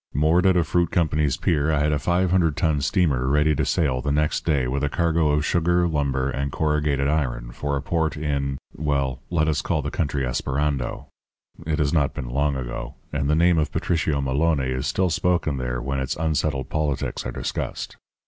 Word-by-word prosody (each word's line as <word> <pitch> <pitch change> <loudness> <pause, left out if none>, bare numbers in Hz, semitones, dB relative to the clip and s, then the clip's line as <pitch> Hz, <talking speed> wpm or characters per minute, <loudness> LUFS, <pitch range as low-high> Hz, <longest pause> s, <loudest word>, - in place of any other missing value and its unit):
Moored 80 +6 +3
at 95 -1 +4
a 85 - +4
fruit 85 +1 +1
company's 75 -5 +1
pier 75 -1 +1
I 75 - +2
had 75 +1 +2
a 75 - +1
500 90 -2 +1
ton 75 -3 +1
steamer 70 -6 +1
ready 75 +2 +3
to - - 0
sail 65 -6 +1
the 70 +2 -1
next 75 +1 +1
day 70 -6 +2
with 70 +2 -2
a 75 - +1
cargo 85 0 +1
of 75 0 +1
sugar, 85 +1 +2
lumber, 70 -4 0
and 70 0 -2
corrugated 75 -3 0
iron - - -1
for 70 +3 -3
a 70 - -5
port 80 0 -1
in 70 -2 -1 0.2
well, 70 -4 -1
let 80 -3 +1
us 75 -1 +1
call 80 -3 -1
the 75 - -3
country 70 -3 -1
Esperando 65 +2 -2 0.6
it 80 -1 0
has 75 -2 +1
not 70 -5 +1
been 65 - -5
long 70 +2 +1
ago, 60 0 -5 0.2
and 70 -1 0
the 75 - +3
name 85 +1 +4
of 75 - -1
Patricio 80 -4 0
Maloné 70 -1 +1
is 65 +1 -2
still 90 +6 +1
spoken 85 -4 +1
there 60 -1 -2
when 70 +2 -2
its 65 +3 -2
unsettled 75 -4 -1
politics 75 -3 -2
are - - -4
discussed. - - -4
75 Hz, 195 wpm, -23 LUFS, 70-80 Hz, 0.6 s, at